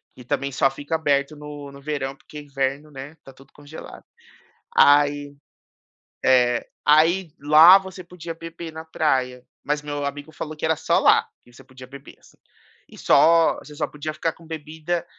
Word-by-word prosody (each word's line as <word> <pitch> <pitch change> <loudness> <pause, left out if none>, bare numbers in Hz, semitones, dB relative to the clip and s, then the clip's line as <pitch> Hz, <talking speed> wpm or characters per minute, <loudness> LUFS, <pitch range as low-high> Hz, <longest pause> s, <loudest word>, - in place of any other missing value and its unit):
E 125 - -13
também 140 +3 -3
só 135 +1 +2
fica 145 +4 -5
aberto 145 -1 0
no 145 -1 -10
no 140 0 -14
verão, 140 -2 -4
porque 150 +2 -12
inverno, 140 +1 -4
né, 135 +2 -9
está 140 -4 -17
tudo 135 +1 -20
congelado. 145 +2 -12 0.7
Aí 145 0 +3 0.9
é. 125 -2 +3 0.2
Aí 165 +4 +3
lá 155 +6 +8
você 190 -1 -10
podia 175 -1 -9
beber 165 0 -9
na 160 - -8
praia, 130 -6 -1 0.2
mas 150 0 -2
meu 145 -1 -5
amigo 145 +2 -6
falou 155 0 -7
que 150 - -4
era 160 0 +1
só 160 - +1
lá - - +4 0.2
que 120 - -22
você 125 - -17
podia 130 -1 -14
beber, 140 +1 -13
assim. - - -23 0.5
E - - -15
só 165 0 +4
você 150 - -14
só - - -2
podia 150 +1 -6
ficar 165 +1 -2
com 165 - -20
a - - -16
bebida, 160 +2 -5
145 Hz, 180 wpm, -22 LUFS, 140-160 Hz, 0.9 s, lá